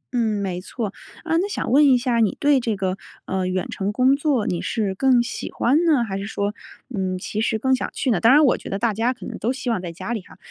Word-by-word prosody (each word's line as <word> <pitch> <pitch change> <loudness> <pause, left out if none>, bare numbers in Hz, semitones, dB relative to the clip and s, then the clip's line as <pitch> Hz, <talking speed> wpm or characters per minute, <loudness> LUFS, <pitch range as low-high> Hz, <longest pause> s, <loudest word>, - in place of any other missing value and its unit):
嗯， 220 -3 +1
没 180 -2 -3
错。 210 -1 -5 0.3
呃， 325 0 +1
那 400 +3 -1
想 400 - -3
问 290 +3 +6
一 260 - +6
下 240 -1 0
你 220 -3 +1
对 285 -2 +4
这 230 -3 -1
个， 190 -1 -2 0.3
呃， 190 -1 -1
远 185 0 -2
程 195 +1 -2
工 255 +5 +3
作 280 -7 0
你 175 - -1
是 205 -4 -1
更 245 +3 +3
喜 - - -5
欢 290 +8 +2
呢， 290 -7 +4
还 195 -3 -4
是 200 - -5
说， 205 -1 -2 0.4
嗯， 185 -1 -1
其 210 +3 -4
实 220 -1 +1
更 260 +4 +2
想 - - -3
去 260 - 0
呢？ 195 - +2
当 230 - +6
然 295 +2 +6
我 255 - +4
觉 - - -9
得 195 - -2
大 230 0 0
家 230 +4 +1
可 255 - -9
能 - - -6
都 235 - 0
希 260 -2 -3
望 210 - -1
在 175 - -5
家 205 +8 -5
里 215 - -3
哈， - - -17
230 Hz, 285 characters per minute, -22 LUFS, 195-260 Hz, 0.4 s, 问